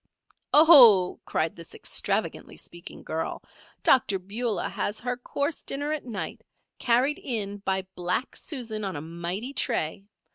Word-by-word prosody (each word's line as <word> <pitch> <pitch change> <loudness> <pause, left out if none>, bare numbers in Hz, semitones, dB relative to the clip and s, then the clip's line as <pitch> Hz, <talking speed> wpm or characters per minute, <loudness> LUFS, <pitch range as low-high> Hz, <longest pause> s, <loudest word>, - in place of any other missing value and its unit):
"Oh!" 250 - +8
cried 160 0 -1
this 170 -1 -10
extravagantly - - -2
speaking 175 0 -9
girl, 160 0 -4 0.4
"Dr. 220 -6 +4
Beulah 210 +5 -3
has 205 - -3
her 245 +1 -2
course 280 +5 -3
dinner 285 +2 -3
at 310 -3 -3
night, 225 -6 -5 0.4
carried 255 +5 +2
in 205 -5 -2
by 190 -1 -1
black 180 +7 -2
Susan 230 -7 -4
on 190 -3 -3
a 145 - -4
mighty 170 - -4
tray. 195 - -2
215 Hz, 135 wpm, -26 LUFS, 180-255 Hz, 0.4 s, Oh